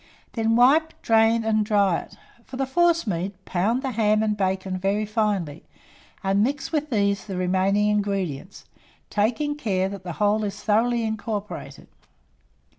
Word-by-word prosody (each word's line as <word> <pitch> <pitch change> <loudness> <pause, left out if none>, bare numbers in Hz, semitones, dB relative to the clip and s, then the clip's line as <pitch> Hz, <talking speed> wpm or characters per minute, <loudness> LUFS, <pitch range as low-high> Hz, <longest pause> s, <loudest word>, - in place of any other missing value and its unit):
Then 225 -1 +1
wipe, 295 +7 +4
drain, 225 0 +3
and 215 -1 +1
dry 200 -4 +2
it. - - -13 0.3
For 260 - -9
the 270 - 0
forcemeat, 265 - +1
pound 220 +9 0
the 265 - -2
ham 215 -1 +2
and 210 -1 0
bacon 190 -1 -2
very 200 +3 0
finely, 205 -8 -1 0.6
and 195 +1 +2
mix 280 +6 -2
with 305 -2 -1
these 200 -4 0
the 190 -3 -4
remaining 190 +3 +1
ingredients, 195 -5 -2 0.5
taking 235 +8 0
care 195 -10 -1
that 200 -1 -7
the 175 -2 -5
whole 210 +4 +1
is 205 0 -5
thoroughly 230 +2 +2
incorporated. 215 -1 -5
210 Hz, 145 wpm, -24 LUFS, 195-230 Hz, 0.6 s, wipe